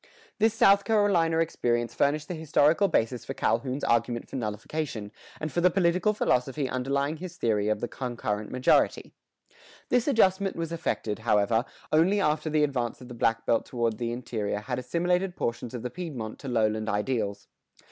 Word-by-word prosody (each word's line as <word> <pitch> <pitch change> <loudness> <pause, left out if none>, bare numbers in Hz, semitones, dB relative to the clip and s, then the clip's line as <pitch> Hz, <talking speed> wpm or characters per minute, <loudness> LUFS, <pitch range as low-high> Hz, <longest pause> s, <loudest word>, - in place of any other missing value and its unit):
[117:3] - - -26 0.3
This 220 0 +3
South 200 -2 +5
Carolina 200 -7 +2
experience 120 -7 0
furnished 150 +2 +1
the - - -4
historical 160 +3 +3
basis 120 - 0
for - - -6
Calhoun's 125 +4 -1
argument 120 0 +1
for - - -9
nullification, 110 0 -4 0.3
and 155 -1 -4
for 175 - 0
the 180 - +5
political 180 +3 +2
philosophy 135 -8 0
underlying 140 +4 -1
his 180 +1 -8
theory 105 - +1
of 110 -1 0
the 120 - -1
"concurrent 115 -5 -4
majority."[118:1] 130 0 +2 0.8
This 245 +1 +2
adjustment 195 -7 +3
was 165 -1 -4
effected, 135 -10 -2
however, 110 +1 +2 0.3
only 175 +7 +4
after 155 -3 +1
the 155 -1 +2
advance 125 -5 -1
of 125 -1 -12
the - - -7
black 115 -1 0
belt 115 - +2
toward 115 -3 -1
the 120 -1 -2
interior 110 -4 -3
had 125 +3 -3
assimilated 175 +7 0
portions 120 +1 -3
of 120 - -6
the 125 - -4
Piedmont 135 -11 -6
to 140 - -8
lowland 110 -3 0
ideals. 105 -2 -2
130 Hz, 170 wpm, -27 LUFS, 115-165 Hz, 0.8 s, South